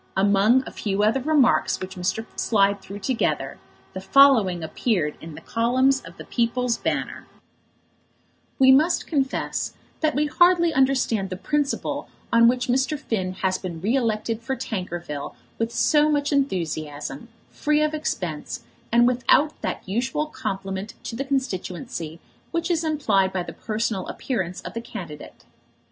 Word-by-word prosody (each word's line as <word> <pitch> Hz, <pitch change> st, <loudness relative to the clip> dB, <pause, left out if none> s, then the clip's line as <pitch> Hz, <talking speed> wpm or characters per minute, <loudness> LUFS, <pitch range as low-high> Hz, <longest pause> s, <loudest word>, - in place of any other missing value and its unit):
Among 205 Hz, +6 st, +4 dB
a -, -, -7 dB
few 205 Hz, -1 st, -1 dB
other 225 Hz, +5 st, +2 dB
remarks 285 Hz, -2 st, +3 dB
which 185 Hz, 0 st, -6 dB
Mr. 190 Hz, +5 st, -2 dB
Slide 200 Hz, -2 st, +2 dB
threw 200 Hz, -, -8 dB
together, 240 Hz, +4 st, -1 dB, 0.3 s
the 190 Hz, -, -5 dB
following 215 Hz, -8 st, +5 dB
appeared 160 Hz, -2 st, -1 dB
in 160 Hz, -1 st, -9 dB
the -, -, -10 dB
columns 255 Hz, +4 st, +2 dB
of -, -, -13 dB
The -, -, -9 dB
People's 240 Hz, 0 st, 0 dB
Banner: -, -, -3 dB, 1.3 s
We 265 Hz, 0 st, +7 dB
must 310 Hz, +6 st, +4 dB
confess 275 Hz, -4 st, -1 dB, 0.2 s
that 310 Hz, -1 st, +1 dB
we 295 Hz, +2 st, +2 dB
hardly 340 Hz, +1 st, +4 dB
understand 260 Hz, -7 st, +2 dB
the 185 Hz, -, -4 dB
principle 290 Hz, +7 st, -1 dB, 0.2 s
on 230 Hz, 0 st, +7 dB
which 250 Hz, +1 st, +2 dB
Mr. 265 Hz, +4 st, +1 dB
Finn 190 Hz, -9 st, -2 dB
has 185 Hz, 0 st, +1 dB
been 175 Hz, -3 st, -6 dB
re 210 Hz, +9 st, +1 dB
elected 225 Hz, -2 st, -1 dB
for 265 Hz, +3 st, -2 dB
Tankerville 175 Hz, -, -5 dB, 0.2 s
with 230 Hz, 0 st, 0 dB
so 300 Hz, +4 st, +3 dB
much 290 Hz, -1 st, +1 dB
enthusiasm, 155 Hz, -, -2 dB, 0.2 s
free 300 Hz, 0 st, +1 dB
of 305 Hz, 0 st, 0 dB
expense, 180 Hz, -, -3 dB, 0.3 s
and 240 Hz, +1 st, +5 dB
without 255 Hz, +4 st, +3 dB
that -, -, -4 dB
usual 260 Hz, +9 st, -1 dB
compliment 195 Hz, -7 st, -5 dB
to 230 Hz, -, -5 dB
the 275 Hz, +4 st, -3 dB
constituency 185 Hz, -, -3 dB, 0.3 s
which 335 Hz, +1 st, -1 dB
is 330 Hz, -1 st, +1 dB
implied 220 Hz, -12 st, +2 dB
by 185 Hz, -2 st, -2 dB
the -, -, -8 dB
personal 215 Hz, -3 st, -2 dB
appearance 190 Hz, -9 st, -3 dB
of -, -, -8 dB
the 230 Hz, -, -4 dB
candidate. 175 Hz, -11 st, -9 dB
230 Hz, 150 wpm, -24 LUFS, 190-275 Hz, 1.3 s, We